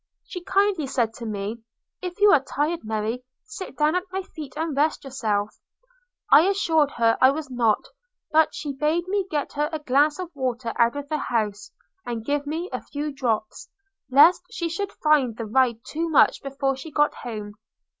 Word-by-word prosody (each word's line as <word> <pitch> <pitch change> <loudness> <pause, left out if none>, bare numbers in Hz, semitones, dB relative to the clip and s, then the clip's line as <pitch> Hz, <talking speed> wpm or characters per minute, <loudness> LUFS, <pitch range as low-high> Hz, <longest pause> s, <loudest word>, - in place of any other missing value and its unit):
She 360 -2 -8
kindly 380 -5 +1
said 235 -4 0
to 235 - -6
me 210 +2 -4 0.4
'If 360 0 -6
you 410 0 +7
are 300 - +6
tired, 300 +4 -2
Mary, 220 +3 -3 0.2
sit 415 -8 -9
down 300 +1 +3
at 365 - +1
my 380 +1 -3
feet 300 -7 -10
and 320 -2 -2
rest 300 +2 +1
yourself.' 215 -6 -2 0.4
– - - -35
I 300 +6 +8
assured 325 -7 +2
her 230 -1 +2
I 260 - +8
was 290 0 -3
not; 230 -4 +1 0.5
but 315 0 +3
she 290 -2 -4
bade 310 +5 0
me 390 0 -1
get 295 -2 -2
her 295 +1 0
a 315 - -2
glass 290 +1 +2
of 365 -2 -6
water 250 -3 -2
out 235 +2 +3
of 285 0 -5
the 305 - -1
house, 210 -5 -2 0.3
and 230 -2 -5
give 285 +1 -1
her 320 +4 -3
a - - -3
few 295 0 -5
drops, 225 -5 -2 0.4
lest 290 +7 +6
she 360 -7 -3
should 400 +4 -3
find 280 -7 +2
the 230 - -4
ride 235 0 +1
too 330 +2 -3
much 305 - +4
before 275 0 -1
she 270 +5 -9
got 295 0 +2
home. 210 -4 -7
285 Hz, 190 wpm, -24 LUFS, 240-325 Hz, 0.5 s, I